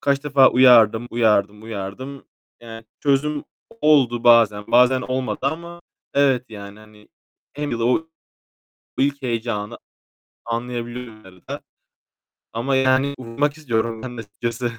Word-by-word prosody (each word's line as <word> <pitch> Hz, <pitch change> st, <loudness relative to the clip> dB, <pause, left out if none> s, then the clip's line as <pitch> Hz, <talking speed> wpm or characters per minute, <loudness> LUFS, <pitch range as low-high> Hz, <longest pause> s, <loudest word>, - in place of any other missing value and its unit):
Kaç 140 Hz, 0 st, 0 dB
defa 140 Hz, -2 st, +5 dB
uyardım, 120 Hz, -3 st, +5 dB
uyardım, 105 Hz, -3 st, +1 dB
uyardım. 115 Hz, +6 st, -7 dB, 0.4 s
Yani 115 Hz, -1 st, -10 dB, 0.2 s
çözüm 145 Hz, +1 st, 0 dB, 0.4 s
oldu 130 Hz, -6 st, +3 dB
bazen 115 Hz, -4 st, +5 dB
bazen 125 Hz, +2 st, +5 dB
olmadı 130 Hz, 0 st, -3 dB
ama 170 Hz, +5 st, -4 dB, 0.3 s
evet, 135 Hz, -3 st, +2 dB
yani 100 Hz, -1 st, -10 dB
hani 105 Hz, -1 st, -18 dB, 0.4 s
hem 145 Hz, 0 st, -4 dB
de 115 Hz, -1 st, -3 dB
o 125 Hz, +7 st, +1 dB, 0.9 s
ilk 140 Hz, +1 st, 0 dB
heyecanı 115 Hz, -3 st, -3 dB, 0.7 s
anlayabiliyorum 120 Hz, 0 st, -5 dB
herhâlde 95 Hz, -1 st, -9 dB, 0.9 s
ama 125 Hz, +4 st, -1 dB
yani 130 Hz, +1 st, +2 dB
uyumak 140 Hz, +5 st, -2 dB
istiyorum 115 Hz, -6 st, -2 dB
ben 125 Hz, -1 st, -7 dB
de -, -, -4 dB
açıkçası. 115 Hz, +3 st, -4 dB
120 Hz, 120 wpm, -21 LUFS, 115-135 Hz, 0.9 s, defa